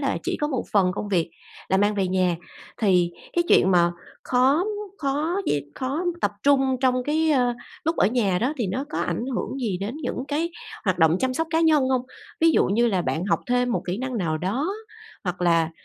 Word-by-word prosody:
là - - 0
chỉ - - -2
có 295 - +1
một 260 -5 -1
phần 185 -3 +3
công 205 - -4
việc 175 -4 0 0.4
là 190 - +3
mang 205 +2 +2
về 195 -2 0
nhà, 185 -2 +1 0.4
thì 180 -5 +3 0.2
cái 345 - +1
chuyện 190 - +5
mà 175 -1 +4 0.3
khó, 260 +4 +3
ưm, 370 +5 0 0.3
khó 295 +5 -1
d - - +1 0.2
khó 275 +7 -2 0.2
tập 205 - +2
trung 270 -2 +3
trong 255 -1 +2
cái, 315 +3 +1
ơ, 250 -4 +2 0.3
lúc 325 +2 0
ở - - +4
nhà 210 -6 +1
đó 250 +8 0
thì 230 - 0
nó 250 +9 -2
có - - -3
ảnh - - -2
hưởng 265 - -3
gì 205 -7 -1
đến 210 +7 -4
những 255 - -3
cái 320 +4 -1 0.3
hoạt 185 -4 +1
động 160 0 +4
chăm 260 0 0
sóc 325 +4 -1
cá 325 -1 +2
nhân 305 -5 +4
hông? 260 -2 +1 0.4
Ví 330 0 +6
dụ - - +3
như 230 +5 +2
là 190 -6 +1
bạn 170 0 -2
học 200 - +1
thêm 245 0 +2
một - - -1
kỹ 180 +3 -2
năng 260 0 -3
nào 160 -5 -1
đó 205 - -1 0.6
hoặc 180 -1 -3
là, 165 -2 +3
245 Hz, 225 wpm, -24 LUFS, 185-275 Hz, 0.6 s, Ví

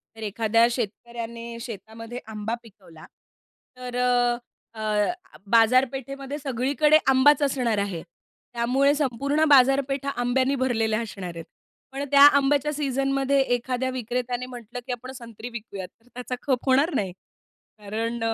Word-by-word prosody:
तर 225 - -12
एखाद्या 225 +2 +2
शेतकऱ्याने 235 0 -5
शेतामध्ये 230 +1 -8
आंबा 215 +2 -3
पिकवला, 190 -8 -16 0.7
तर 250 -1 -7 0.8
अ, 220 - -7 0.7
बाजारपेठेमध्ये 270 +4 +2
सगळीकडे 280 +4 +3
आंबाच 270 +2 +5
असणार 250 -5 0
आहे. 195 -5 -2 0.5
त्यामुळे 255 +4 +2
संपूर्ण 285 +2 0
बाजारपेठ 270 0 +4
हा 280 - 0
आंब्यानी 260 +3 +1
भरलेला 225 -4 0
असणार 190 -5 -7
आहे. 165 - -7 0.5
पण 275 +1 -4
त्या 280 - +6 0.2
आंब्याच्या 285 +1 +2
सीझनमध्ये 275 -1 0 0.2
एखाद्या 250 +1 -2
विक्रेत्याने 250 0 -3
म्हटलं, 245 -1 -8
"की - - -3
आपण 250 +1 -6
संत्री 235 -2 -9
विकूयात." 205 -5 -7
तर 230 - -29
त्याचा 250 +1 -5
खप 260 -3 0
होणार 280 +5 +3
नाही. 190 -6 -1 0.7
कारण 225 +3 -3
245 Hz, 125 wpm, -25 LUFS, 225-270 Hz, 0.8 s, त्या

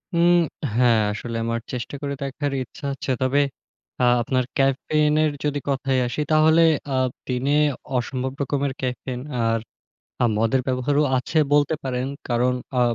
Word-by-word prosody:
উম 170 +1 +5 0.4
হ্যাঁ, 120 -2 +4
আসলে 115 +2 -5
আমার 115 0 -1
চেষ্টা 125 +3 -4
করে 140 -1 -2
দেখবার 140 +1 -3
ইচ্ছা 140 +4 -11
আছে। 135 0 -4
তবে 130 +2 +2 0.6
আ - - +3 0.2
আপনার 130 +2 0
caffeine 150 +3 +2
এর 155 - +2
যদি 145 -1 0
কথায় 135 -1 0
আসি 120 +5 -3
আ - - -25
তাহলে 155 +1 +5 0.7
দিনে 125 +2 -1 0.5
অসম্ভব 130 +1 -2
রকমের 140 0 0
caffeine 125 0 -4 0.2
আর 115 0 +1 0.6
আ - - +5
মদের 115 +4 +2
ব্যবহারও 130 +3 +1 0.2
আছে 140 +5 -1
বলতে 145 +2 +4
পারেন। 125 -1 -2 0.2
কারণ 125 +1 +2 0.2
আ - - +4
130 Hz, 150 wpm, -23 LUFS, 125-145 Hz, 0.7 s, উম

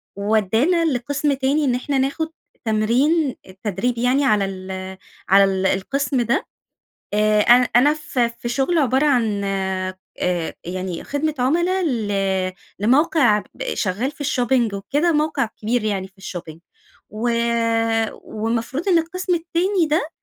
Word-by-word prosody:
وودّانا 220 - +2
لقسم 285 +1 0
تاني 275 +3 +1
إن 250 -3 +2
احنا 270 +3 -1
ناخد 280 +5 -1 0.4
تمرين 250 +8 +2
التدريب 200 +5 -3
يعني 250 +4 +2
على 210 -5 +3
ال 190 0 -6 0.3
على 190 0 +4
القسم 270 +6 -1
ده، 240 +4 0 0.7
آآ، 210 0 +3
أنا 240 +3 +6
أنا 280 +5 +6
ف 305 -4 -5
في 235 0 -1
شغل 275 +8 +1
عبارة 265 0 +2
عن 225 -8 +1
آآ 190 -1 -2 0.7
يعني 185 0 -4
خدمة 300 +2 -1
عملا 345 +9 +1
ل 235 -10 -1 0.7
لموقع 245 0 +3
ب - - -4
شغال 210 +8 -1
في 290 0 -8
الshopping 250 -5 +1
وكده، 290 - 0
موقع 300 -3 +1 0.2
كبير 230 +2 0
يعني 195 -3 -1
في 190 0 -24
الshopping 170 -4 -7 0.5
و 220 +4 -2 0.9
والمفروض 230 - -3
إن 350 - +5
القسم 365 +3 -1
التاني 345 +2 0
ده، 305 +1 0
245 Hz, 130 wpm, -21 LUFS, 205-295 Hz, 0.9 s, أنا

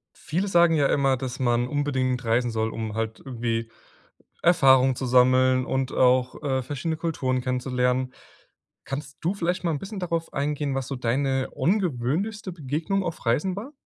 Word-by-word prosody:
Viele 175 +7 -2
sagen 170 -3 +4
ja 145 -3 +3
immer, 135 -2 +2
dass 130 0 -5
man 120 -1 +2
unbedingt 130 -3 -1
reisen 120 +2 +1
soll, 110 -1 -1
um 110 -2 -5
halt 110 0 -3
irgendwie 115 -3 -3 0.7
Erfahrungen 135 -6 +5
zu 130 - -4
sammeln 130 +1 +4
und 130 0 -1
auch, 130 +1 +2
äh, 135 -2 0
verschiedene 145 +5 -3
Kulturen 135 -6 -1
kennenzulernen. 125 0 -1 0.7
Kannst 140 +1 -6
du 170 +4 0
vielleicht 180 -1 -2
mal 170 - +1
'n 150 - -2
bisschen 195 +3 -7
darauf 170 -2 -3
eingehen, 145 -1 -1
was 135 -2 -2
so 135 - -4
deine 130 +2 0
ungewöhnlichste 180 - -1
Begegnung 165 +5 -2
auf 170 -6 -5
Reisen 150 +11 +1
war? 230 +9 -7
135 Hz, 160 wpm, -25 LUFS, 125-165 Hz, 0.7 s, Erfahrungen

